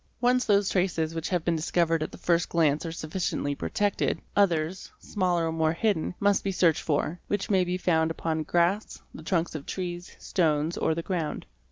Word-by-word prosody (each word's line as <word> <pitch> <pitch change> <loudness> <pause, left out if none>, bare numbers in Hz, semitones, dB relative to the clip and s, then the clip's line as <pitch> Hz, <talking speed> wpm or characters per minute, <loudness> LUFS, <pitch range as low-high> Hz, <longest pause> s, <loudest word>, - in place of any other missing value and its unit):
Once 250 +1 +3
those 200 -2 +3
traces 170 -4 0
which 165 -1 -3
have 175 -3 -1
been 170 - +2
discovered 165 0 +1
at 155 - -3
the - - -10
first 170 0 +1
glance 155 -1 +2
are - - -4
sufficiently 155 -3 -2
protected, 205 +7 -1 0.2
others, 175 -3 +1
smaller 180 -4 0
or 165 - -1
more 160 -1 +1
hidden, 180 -2 0
must 200 -1 +2
be 195 - -1
searched 170 -4 +3
for, 155 +3 -1
which 205 +1 -2
may 190 -2 +4
be 180 0 -2
found 160 -3 +2
upon 160 -1 -2
grass, 175 +6 0
the - - -9
trunks 170 +1 -1
of 155 -3 -5
trees, 175 -1 -5
stones, 160 -2 0
or 160 - 0
the 165 - -3
ground. 165 -5 -3
170 Hz, 190 wpm, -27 LUFS, 160-185 Hz, 0.2 s, may